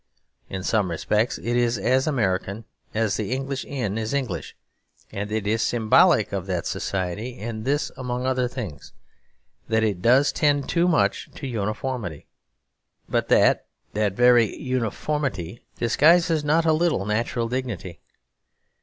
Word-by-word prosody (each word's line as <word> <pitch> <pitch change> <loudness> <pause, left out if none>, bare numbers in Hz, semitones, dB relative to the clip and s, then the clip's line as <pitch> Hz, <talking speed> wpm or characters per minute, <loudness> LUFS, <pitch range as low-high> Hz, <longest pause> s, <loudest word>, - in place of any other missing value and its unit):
In 95 -1 -5
some 105 -2 +1
respects 105 +7 0
it 120 +1 -2
is 120 -1 +2
as 130 +7 +1
American 100 -5 -1 0.3
as 110 -2 0
the 105 0 -3
English 135 +1 -3
inn 115 -6 -3
is 110 +5 -2
English. 120 -12 -3 0.6
And 100 +1 -4
it 110 -2 -1
is 110 +2 +1
symbolic 110 -1 +4
of - - -3
that - - -2
society 100 +6 -3
in 110 0 -5
this 145 +3 0
among 125 -1 -3
other 130 -1 +1
things: 110 - -7 0.8
that 110 0 +2
it 100 -5 0
does 130 +7 +4
tend 145 -2 +1
too 175 +1 +2
much 170 - +1
to - - -7
uniformity; 110 - -3 0.8
but - - 0
that - - +4 0.3
that 105 -2 0
very 120 -1 +4
uniformity 125 - -2 0.2
disguises 160 +6 +4
not 160 +3 +2
a 160 - +4
little 155 - +1
natural 115 +2 -1
dignity. 115 -9 -4
120 Hz, 140 wpm, -24 LUFS, 105-130 Hz, 0.8 s, symbolic